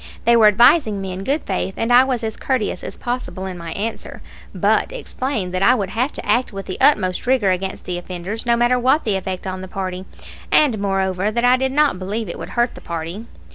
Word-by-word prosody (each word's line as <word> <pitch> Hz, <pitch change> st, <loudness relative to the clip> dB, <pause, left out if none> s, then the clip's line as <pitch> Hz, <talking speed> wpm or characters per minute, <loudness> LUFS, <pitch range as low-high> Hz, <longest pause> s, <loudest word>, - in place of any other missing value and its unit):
They 235 Hz, -, +5 dB
were 225 Hz, -2 st, +7 dB
advising 220 Hz, +1 st, +4 dB
me 190 Hz, -1 st, -5 dB
in 185 Hz, +1 st, -5 dB
good 280 Hz, +8 st, -1 dB
faith, 190 Hz, 0 st, -3 dB
and 230 Hz, +2 st, +1 dB
I 250 Hz, +1 st, +8 dB
was 255 Hz, -3 st, -2 dB
as 220 Hz, -1 st, -3 dB
courteous 240 Hz, -8 st, -2 dB
as -, -, -7 dB
possible 240 Hz, -6 st, -4 dB
in 190 Hz, -1 st, -5 dB
my 170 Hz, -1 st, -7 dB
answer, 225 Hz, +3 st, -5 dB, 0.3 s
but -, -, +1 dB
explained 255 Hz, -, -4 dB
that 185 Hz, -, -1 dB
I 200 Hz, -, +5 dB
would 195 Hz, -5 st, -3 dB
have 250 Hz, +7 st, 0 dB
to -, -, -6 dB
act 250 Hz, 0 st, +1 dB
with 195 Hz, -1 st, -7 dB
the 185 Hz, -, -6 dB
utmost 185 Hz, -6 st, +2 dB
rigor 250 Hz, -7 st, +3 dB
against 190 Hz, +1 st, -3 dB
the 180 Hz, -1 st, -3 dB
offenders, 180 Hz, +5 st, -6 dB
no 235 Hz, -1 st, +2 dB
matter 240 Hz, +1 st, +3 dB
what 260 Hz, +5 st, +3 dB
the 210 Hz, -4 st, 0 dB
effect 190 Hz, -1 st, -4 dB
on 185 Hz, 0 st, -4 dB
the 190 Hz, -, -7 dB
party, 185 Hz, -1 st, -5 dB, 0.5 s
and, 260 Hz, -8 st, +4 dB
moreover, 195 Hz, 0 st, 0 dB
that 235 Hz, +3 st, 0 dB
I 250 Hz, +1 st, +6 dB
did 265 Hz, +1 st, -1 dB
not 290 Hz, -8 st, +2 dB
believe 205 Hz, +4 st, -3 dB
it -, -, -6 dB
would -, -, -7 dB
hurt 240 Hz, 0 st, +2 dB
the -, -, -12 dB
party. 170 Hz, +7 st, -6 dB
210 Hz, 230 wpm, -20 LUFS, 185-245 Hz, 0.5 s, I